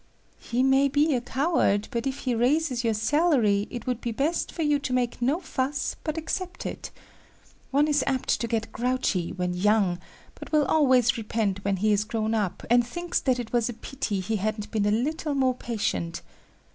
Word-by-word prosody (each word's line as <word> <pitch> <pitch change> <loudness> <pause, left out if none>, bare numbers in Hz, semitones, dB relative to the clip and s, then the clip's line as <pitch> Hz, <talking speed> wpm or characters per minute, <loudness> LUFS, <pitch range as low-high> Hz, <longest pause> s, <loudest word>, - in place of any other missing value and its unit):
"He 245 +2 -1
may 270 +1 +4
be 290 +2 +2
a 245 - 0
coward, 255 - +1
but 235 +2 -2
if 270 +1 -3
he 255 - 0
raises 250 +2 +1
your 225 -2 +1
salary, 220 -5 +2
it 240 -3 -7
would 250 -2 -2
be 235 - -2
best 285 +9 -1
for 330 - -3
you 295 -1 +2
to 275 -2 -3
make 245 -1 -1
no 275 +8 +2
fuss, 275 -5 -2
but 310 0 -3
accept 350 +3 -4
it. - - -5 0.8
One 285 +3 +3
is 295 -2 +2
apt 265 -2 0
to 235 - -1
get 225 0 -2
grouchy 240 -7 -1
when 180 -1 -2
young, 190 -1 +2 0.3
but - - -11
will 305 -2 +3
always 255 -5 +3
repent 210 -3 -1
when 200 -1 0
he 215 +3 +2
is 205 0 +2
grown 220 0 -2
up 205 -5 -1
and 240 +1 +5
thinks 345 +8 -2
that 255 -2 +1
it 240 -2 -6
was 240 -1 +2
pity 225 -8 -2
he 220 +4 -1
hadn't 210 +1 -3
been 210 -2 +1
a - - +2
little 290 +6 -1
more 260 -2 +2
patient. 220 -8 -3
245 Hz, 195 wpm, -26 LUFS, 215-280 Hz, 0.8 s, and